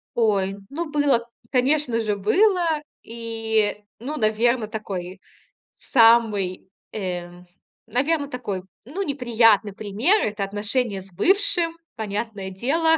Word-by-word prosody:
Ой, 200 -4 +1
ну 320 +2 -4
было, 280 -6 +2 0.3
конечно 260 -2 +2
же, 210 -2 -1
было. 360 - +3 0.4
И, 225 -2 -1 0.2
ну, 295 +6 -5
наверно, 220 +1 +2
такой 190 -4 -6 0.5
самый, 225 -6 +3 0.2
э, 180 -4 -3 0.6
наверно, 285 +5 0
такой, 210 -8 -4 0.2
ну, 360 +10 -3
неприятный 230 - +3
пример- 220 - +2
это 210 -1 -1
отношения 205 +1 -1
с 190 0 -16
бывшим, 355 - +2 0.2
понятное 210 -2 -4
дело. 320 - +2
225 Hz, 105 wpm, -23 LUFS, 205-280 Hz, 0.6 s, было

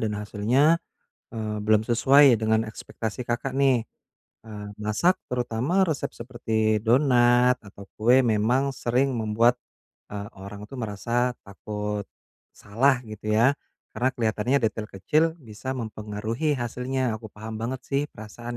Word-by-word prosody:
dan 105 -2 -1
hasilnya, 120 +10 +2 0.5
eee, 110 -1 -3
belum 110 0 +4
sesuai 130 +2 +5
dengan 110 0 +2
ekspektasi 110 +2 -6
Kakak 125 +3 -2
nih. 130 -4 +4 0.6
Eee, 105 -1 -8
masak, 170 - +2
terutama 125 +9 0
resep 155 -3 -2
seperti 110 -3 -1
donat 125 0 +4
atau 100 -1 -13
kue 125 +4 +5
memang 120 +5 +2
sering 130 +2 +1
membuat, 115 +2 +3 0.6
eee, 100 0 -5
orang 100 +2 -9
itu 135 - -12
merasa 120 +3 -1
takut 105 +1 -5 0.5
salah 125 +5 +1
gitu 110 0 -6
ya, 125 +5 +5 0.4
karena 125 +4 +1
kelihatannya 115 +3 +1
detail 110 0 -1
kecil 150 - +1
bisa 130 0 -6
mempengaruhi 110 +5 -3
hasilnya. 125 +1 -2
Aku 110 - -10
paham 110 +1 -8
banget 125 +3 -3
sih 140 +1 0
perasaan 120 +3 -8
115 Hz, 130 wpm, -25 LUFS, 105-130 Hz, 0.6 s, sesuai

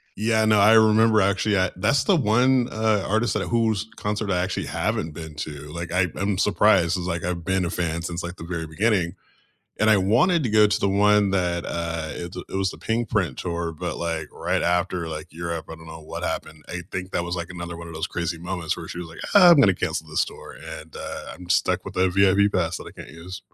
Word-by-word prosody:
yeah, 110 +1 +2
no, 110 -1 +4
I 105 +3 +6
remember 110 0 +5
actually, 100 +1 +2
I 95 -1 +1
that's 105 +9 +2
the 195 - +3
one, 125 0 +3
uh, 110 -2 +1
artist 110 +3 +1
that - - -2
whose 110 -3 0
concert 105 0 -3
I 90 - +1
actually 95 - -3
haven't 80 0 -2
been 80 -2 -8
to, 75 -1 -6
like, 85 +1 -5
I 90 +1 +3
I'm 95 0 -1
surprised, 100 -4 +3
'cause, 90 -1 -3
like, 85 -1 -3
I've 85 -1 -3
been 95 0 0
a - - -3
fan 85 -1 -2
since, 85 0 -4
like, 85 +1 -6
the 80 - -10
very 85 -2 -4
beginning, 95 +1 0 0.6
and 110 - +3
I 110 - +6
wanted 125 - +3
to 120 - -1
go 105 0 +6
to 105 - 0
the 100 - +2
one 105 0 +4
that, 90 -3 0
uh, 85 -2 -3
it 85 +1 -7
it - - -9
was 95 -1 0
the - - -10
Pinkprint 110 - -1
Tour, 85 -1 -3
but, 80 - -5
like, 80 -3 -3
right - - -1
after, 90 -1 0
like, 75 -1 -6
Europe, 85 0 -5
I - - -6
don't 80 0 -14
know 80 0 -9
what 75 - -7
happened 80 -1 -4
I 90 0 -5
think 95 0 -5
that 85 - -1
was, 85 +1 -3
like, 85 0 -4
another 85 -1 -6
one 85 0 -8
of 85 - -9
those 80 - -2
crazy 85 -1 -3
moments 85 -1 -3
where - - -8
she - - -7
was 85 -1 -6
like, 85 - -11
"Ah, 185 -3 +9
I'm 165 -4 +7
gonna 95 -8 +5
cancel 80 - -3
this 75 - +1
tour," - - -11 0.2
and, 80 0 -16
uh, - - -7
I'm 90 -1 -12
stuck 90 - +1
with - - -8
a 95 0 +3
VIP 100 +2 +4
pass 90 -4 0
that - - -10
I - - -10
can't - - -10
use. 90 +3 -9
90 Hz, 240 wpm, -24 LUFS, 85-105 Hz, 0.6 s, Ah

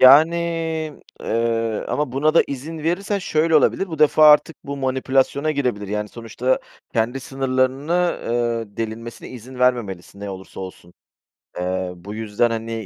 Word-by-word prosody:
Yani, 150 +6 +8 0.8
eee, 115 -1 0
ama 145 -4 -1
buna 150 +3 +2
da - - +7
izin 145 +4 -6
verirsen 185 +6 -1
şöyle 160 -3 +2
olabilir. 195 +5 +3
Bu 160 -3 -6
defa 155 0 +7
artık 150 +1 +4
bu 140 0 -4
manipülasyona 135 +2 +1
girebilir. 125 -9 -1
Yani, 105 +1 -2
sonuçta 115 +3 -1 0.3
kendi 120 +3 0
sınırlarını, 135 +6 0
eee, 115 -3 -1
delinmesine 115 +1 -5
izin 125 +1 -10
vermemelisin. 110 -7 0
Ne 100 -1 -5
olursa 95 0 -9
olsun. 95 -2 -9 0.7
Eee, 90 0 -2
bu 100 +4 -9
yüzden, 110 +2 0
hani, 115 0 -3
125 Hz, 140 wpm, -22 LUFS, 110-145 Hz, 0.8 s, Yani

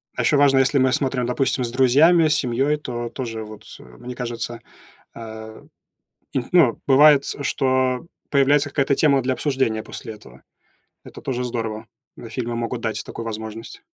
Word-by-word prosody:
А - - -1
ещё 145 - +3
важно, 140 -1 +4
если 135 +2 +3
мы 130 -1 +3
смотрим, 130 -2 0
допустим, 125 +1 0
с 115 - -3
друзьями, 145 +7 +5
с 150 - +2
семьёй, 135 +4 0
то 120 -5 -5
тоже, 115 -4 -5
вот, 110 0 -11 0.2
мне 65 - -10
кажется 120 -1 -5 0.6
э, 110 -1 -9 0.7
и 135 - 0
тн 120 - -10
ну, 160 -10 +4
бывает, 140 +1 +6 0.2
что 130 0 0 0.2
появляется 145 +1 +3
какая-то 140 -1 +1
тема 140 -3 +3
для 130 +1 0
обсуждения 130 -7 -1
после 110 -2 -8
этого. 65 - -16 0.6
Это - - -12
тоже 125 -1 -3
здорово. 115 -3 -4 0.3
Когда 115 - -10
фильмы 120 0 -4
могут 120 0 -3
дать 110 -1 -3
такую 115 - -8
возможность. 110 - -7
125 Hz, 165 wpm, -22 LUFS, 115-135 Hz, 0.7 s, бывает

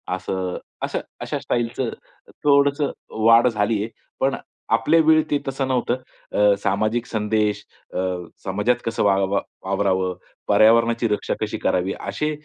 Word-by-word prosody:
असं 95 0 -3 0.3
असं - - -1 0.2
अशा - - -3
स्टाईलचं 120 +1 -1 0.5
थोडंसं 140 0 +3 0.3
वाढ 115 +2 +7
झाली 110 -1 +1
आहे. 110 - -5 0.3
पण 135 +1 +1 0.4
आपल्या 115 +9 +3
वेळी 155 0 +5
ते 145 - +3
तसं 135 0 -1
नव्हतं. 125 -1 0 0.3
अ, 105 -1 +4
सामाजिक 110 +4 0
संदेश 105 -2 0 0.3
अ, - - -4 0.5
समाजात 105 +6 +1
कसं 115 -1 0
वाव 100 -1 +2
वावरावं? 95 -2 -1 0.3
पर्यावरणाची 115 +3 +4
रक्षा 105 - -1
कशी - - -2
करावी? 90 +1 0
असे 150 0 -2
115 Hz, 130 wpm, -22 LUFS, 100-125 Hz, 0.5 s, वाढ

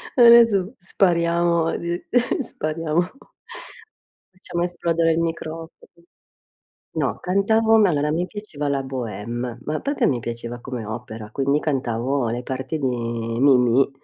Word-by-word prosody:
Adesso 235 -4 +6
spariamo, 170 -2 +1
d 170 +1 -3 0.4
spariamo 165 - -1 1.3
Facciamo 175 -1 -4
esplodere 170 -2 +1
il 165 - 0
microfono. 165 -1 -4 1.2
No, - - -1
cantavo, 220 +4 +3
ma 210 -3 +5
allora 150 -2 0
mi 175 +3 0
piaceva 180 -8 -6
la 140 -1 0
Bohème. 120 -1 -5
Ma 155 +1 -2
proprio 285 +1 0
mi 125 - 0
piaceva 120 +1 -6
come 125 -2 -6
opera, 110 0 -7
quindi 140 +3 +1
cantavo 130 -2 -1
le 120 +2 -3
parti 130 +5 -4
di 135 - 0
Mimì, 120 +2 +2
150 Hz, 120 wpm, -22 LUFS, 125-175 Hz, 1.3 s, Adesso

